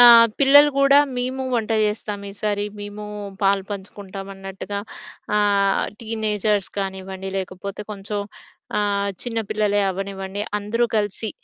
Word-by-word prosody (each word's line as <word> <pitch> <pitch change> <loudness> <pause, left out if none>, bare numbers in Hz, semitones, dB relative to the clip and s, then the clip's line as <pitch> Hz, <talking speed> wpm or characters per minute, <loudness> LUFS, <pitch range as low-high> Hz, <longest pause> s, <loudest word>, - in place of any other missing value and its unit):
ఆహ్, 235 -1 +10
పిల్లలు 285 +2 +8
కూడా 275 +1 +7 0.2
మేము 255 +2 -1
వంట 225 -1 -1
చేస్తాం 210 -1 -2
ఈసారి, 205 0 -1 0.2
మేము 205 +1 -7 0.4
పాలు 195 0 +3
పంచుకుంటాం 195 -1 -7
అన్నట్టుగా 195 +1 -5 0.6
ఆహ్, 200 -1 +3 0.2
టీనేజర్స్ 215 -2 0
కానివ్వండి 190 0 -4
లేకపోతే 190 +2 -5
కొంచెం 205 +1 -4 0.6
ఆహ్, 200 -1 +1
చిన్న 230 -2 -2
పిల్లలే 210 -1 +2
అవ్వనివ్వండి. 195 +1 -4 0.2
అందరూ 230 +4 +1
కలిసి 205 +1 -1
205 Hz, 115 wpm, -22 LUFS, 195-220 Hz, 0.6 s, ఆహ్